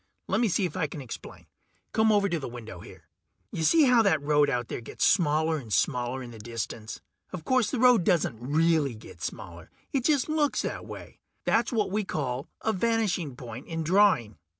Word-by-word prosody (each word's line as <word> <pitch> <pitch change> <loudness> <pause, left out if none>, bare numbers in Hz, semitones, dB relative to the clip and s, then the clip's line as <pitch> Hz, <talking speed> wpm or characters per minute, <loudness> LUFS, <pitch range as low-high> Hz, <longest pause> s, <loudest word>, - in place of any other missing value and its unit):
Lemme 235 - +2
see 185 +2 +1
if 175 - -5
I 170 -5 0
can 150 - -8
explain. 130 -4 -9 0.5
Come 220 0 +3
over 205 -1 +3
to 170 -4 -1
the 135 - -5
window 115 -6 -9
here. - - -14 0.4
Ya - - -4
see 310 - +5
how 250 -4 +5
that 195 -8 +3
road 145 0 +2
out 120 -3 -1
there - - -5
gets 115 - -2
smaller 160 -2 +2
and 120 -7 -9
smaller 125 +2 0
in 120 - -9
the 115 - -11
distance? 115 0 -6 0.3
Of 180 -4 -7
course 255 -5 +2
the 265 - -2
road 245 -5 +5
doesn't 150 -10 +1
really 150 0 +1
get 110 - -13
smaller - - -7 0.2
it 265 -3 0
just 290 -5 +2
looks 310 -2 +1
that - - -5
way. - - -10 0.3
That's - - +2
what 215 -5 0
we 210 +1 0
call 135 -7 -3
a 220 - 0
vanishing 190 - 0
point 125 +1 -9
in 165 -1 -3
drawing. 170 - +3
160 Hz, 195 wpm, -27 LUFS, 125-210 Hz, 0.5 s, see